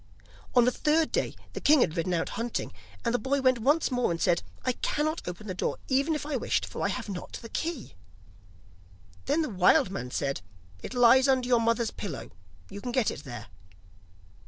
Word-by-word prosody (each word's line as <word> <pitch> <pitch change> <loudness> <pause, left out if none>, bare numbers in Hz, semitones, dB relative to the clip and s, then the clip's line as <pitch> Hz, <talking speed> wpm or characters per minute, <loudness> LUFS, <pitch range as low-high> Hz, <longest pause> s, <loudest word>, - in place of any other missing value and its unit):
On 245 -1 +6
the 250 - +4
third 310 +4 +2
day - - -1 0.2
the - - -5
king 295 -2 +5
had 160 -6 +1
ridden 175 +1 0
out 165 - -1
hunting, 235 0 -3 0.3
and 235 - +1
the 245 - +2
boy 275 +5 0
went 255 -2 +3
once 290 +6 +2
more 250 -1 +1
and 165 -1 -2
said: 175 -1 +2 0.2
'I - - +3
cannot 310 +2 0
open 180 +4 -6
the 190 - -4
door 180 - -2
even 280 +4 +2
if 300 - -4
I 295 -1 -2
wished, - - 0
for - - -7
I - - +2
have - - -3
not 190 -3 -6
the 230 - -7
key.' 325 -3 -4 1.3
Then 300 +4 +2
the 305 - -3
wild 200 - +4
man 160 -10 -4
said: 135 -3 -2 0.4
'It - - -7
lies 245 +2 +6
under 260 -2 +2
your 240 -2 +4
mother's 230 0 +1
pillow, 175 - -6 0.4
you 200 +1 -8
can 245 - -4
get 245 -3 +2
it 145 - -9
there. 120 -3 -7
245 Hz, 205 wpm, -28 LUFS, 195-275 Hz, 1.3 s, On